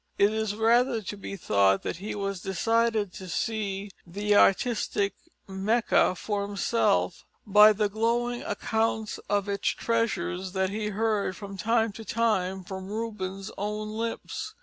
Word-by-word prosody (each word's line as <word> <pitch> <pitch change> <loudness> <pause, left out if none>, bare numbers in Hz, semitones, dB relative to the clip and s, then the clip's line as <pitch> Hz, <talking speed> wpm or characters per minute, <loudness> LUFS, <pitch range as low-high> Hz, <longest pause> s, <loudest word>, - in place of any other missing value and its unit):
It 205 +2 +4
is 220 -2 -1
rather 230 +1 +3
to 205 - -5
be 200 0 -7
thought 100 - +2
that - - -3
he 200 +4 -5
was 195 -2 -3
decided 220 +1 +1
to 185 -1 -9
see 200 +1 -2
the 205 +4 0
artistic 205 -1 +3 0.3
Mecca 195 0 +2
for 205 +2 -2
himself, 200 - 0 0.2
by 210 +1 +8
the 210 0 +1
glowing 235 +3 0
accounts 220 -1 -1
of 205 -1 +1
its 200 -1 -2
treasures 190 -5 -1
that 190 -1 0
he 210 +1 -2
heard 210 -2 0
from 200 -1 -8
time 225 +2 +1
to 220 +3 -9
time 190 -5 0
from 190 +1 -7
Rubens' 195 -3 -4
own 210 +1 -3
lips. 230 - -4
210 Hz, 145 wpm, -27 LUFS, 195-225 Hz, 0.3 s, by